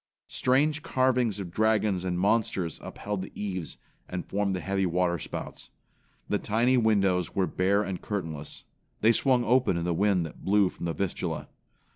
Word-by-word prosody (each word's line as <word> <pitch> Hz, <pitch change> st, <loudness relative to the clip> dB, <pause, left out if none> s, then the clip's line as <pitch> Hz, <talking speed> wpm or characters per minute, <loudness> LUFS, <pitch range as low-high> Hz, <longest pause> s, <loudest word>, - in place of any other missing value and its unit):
Strange 145 Hz, +4 st, +2 dB
carvings 125 Hz, -7 st, +1 dB
of 90 Hz, -3 st, -5 dB
dragons 105 Hz, -2 st, +2 dB
and 90 Hz, -1 st, -1 dB
monsters 100 Hz, -4 st, +1 dB
upheld 105 Hz, -2 st, -5 dB
the 95 Hz, -, -7 dB
eaves 95 Hz, -5 st, -4 dB, 0.3 s
and 90 Hz, -1 st, -4 dB
formed 100 Hz, -1 st, -1 dB
the -, -, -2 dB
heavy 95 Hz, +1 st, -1 dB
water 85 Hz, 0 st, +1 dB
spouts. -, -, -7 dB, 0.6 s
The -, -, 0 dB
tiny, 120 Hz, +4 st, +2 dB
windows 100 Hz, -7 st, +2 dB
were 95 Hz, -, +2 dB
bare 100 Hz, +3 st, +1 dB
and 95 Hz, -3 st, -4 dB
curtainless. 80 Hz, -8 st, -5 dB, 0.4 s
They 110 Hz, -, +6 dB
swung 125 Hz, +1 st, +3 dB
open 125 Hz, -7 st, +3 dB
in 85 Hz, -, -2 dB
the 85 Hz, 0 st, 0 dB
wind 95 Hz, -1 st, +2 dB
that 80 Hz, -, -10 dB
blew 100 Hz, -1 st, +3 dB
from 85 Hz, -, -6 dB
the 85 Hz, -, -1 dB
Vistula. 100 Hz, 0 st, -3 dB
100 Hz, 165 wpm, -28 LUFS, 90-110 Hz, 0.6 s, They